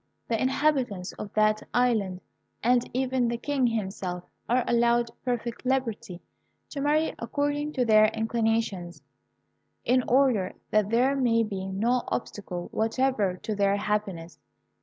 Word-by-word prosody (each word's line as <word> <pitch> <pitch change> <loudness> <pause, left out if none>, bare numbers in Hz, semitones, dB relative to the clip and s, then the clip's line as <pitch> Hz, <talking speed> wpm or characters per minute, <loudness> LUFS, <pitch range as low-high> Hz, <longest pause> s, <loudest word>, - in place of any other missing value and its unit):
The 225 -2 0
inhabitants 260 -8 0
of 205 - -6
that 215 0 +3
island, 215 -7 +1 0.4
and 245 +1 +2
even 260 -1 0
the 235 0 -1
King 270 0 0
himself, 190 -5 -3 0.3
are 245 +1 +3
allowed 235 0 +2
perfect 240 -1 -3
liberty 235 -9 -2 0.5
to 280 - -4
marry 305 +2 +2
according 290 +4 -2
to 250 - +1
their 215 -1 +6
inclinations, 220 -5 -1 0.8
in 255 +1 +3
order 245 -8 +2 0.2
that 215 -1 +2
there 250 +5 +3
may 235 -4 +2
be 195 -3 -4
no 230 +6 +1
obstacle 180 -7 -4
whatever 220 -4 0
to 215 - -2
their 200 -1 +2
happiness. 200 -5 -3
230 Hz, 130 wpm, -27 LUFS, 205-255 Hz, 0.8 s, their